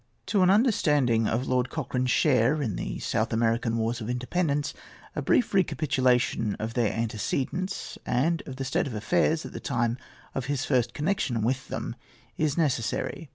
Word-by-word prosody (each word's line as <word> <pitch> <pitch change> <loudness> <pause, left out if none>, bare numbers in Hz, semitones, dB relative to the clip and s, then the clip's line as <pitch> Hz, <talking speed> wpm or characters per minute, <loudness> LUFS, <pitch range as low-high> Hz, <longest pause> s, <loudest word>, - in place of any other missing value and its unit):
To 195 0 +2
an 185 - +5
understanding 150 - +3
of 120 +4 -1
Lord 125 -1 +1
Cochrane's 130 -4 -2
share 130 +2 +3
in 115 -10 -1
the - - -4
South 110 0 -1
American 115 0 +1
wars 115 +1 -1
of 110 - -5
independence 145 +4 -1 0.4
a - - -1
brief 240 - +2
recapitulation 130 - +2
of 110 +1 -4
their 115 -4 +1
antecedents, 130 - -2
and 160 +7 +1
of 135 - -6
the 135 0 -4
state 130 - 0
of 125 - -5
affairs 160 +8 +1
at - - -8
the - - -5
time 120 -2 -1 0.3
of 135 - -3
his 140 0 -1
first 120 -4 +1
connection 150 - 0
with 130 +3 -1
them, - - -4 0.4
is 155 -1 0
necessary. 140 +1 -1
130 Hz, 165 wpm, -27 LUFS, 115-155 Hz, 0.4 s, an